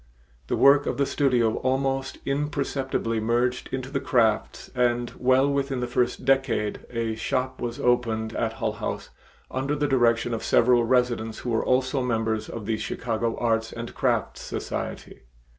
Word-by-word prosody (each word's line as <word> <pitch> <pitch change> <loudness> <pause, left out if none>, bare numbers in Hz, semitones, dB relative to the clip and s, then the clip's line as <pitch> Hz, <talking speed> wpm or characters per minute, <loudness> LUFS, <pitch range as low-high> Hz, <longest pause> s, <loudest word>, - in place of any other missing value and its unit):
The - - 0
work 140 +1 +5
of - - -1
the 140 - +2
studio 125 -6 +2
almost 135 +1 -1
imperceptibly 140 -4 -1
merged 120 +3 0
into 130 0 -4
the 140 - 0
crafts 115 -5 0
and 120 -1 +1
well 130 +2 +4
within 140 -2 -1
the 125 - -1
first 120 0 -1
decade 135 -6 +1
a 115 -2 -2
shop 130 +3 -2
was 120 +2 -4
opened 115 -4 +1
at 115 -1 -1
Hull - - -2
House - - -5 0.4
under 135 +3 -1
the 145 0 0
direction 120 -3 +2
of 115 - -2
several 120 0 +4
residents 120 -3 +1
who 120 - -3
were 110 - +1
also 130 +1 +1
members 110 -3 -1
of 115 -3 -6
the 110 0 0
Chicago 115 0 -2
Arts 115 -1 0
and 115 0 -7
Crafts - - 0
Society. - - -5
125 Hz, 160 wpm, -25 LUFS, 115-135 Hz, 0.4 s, work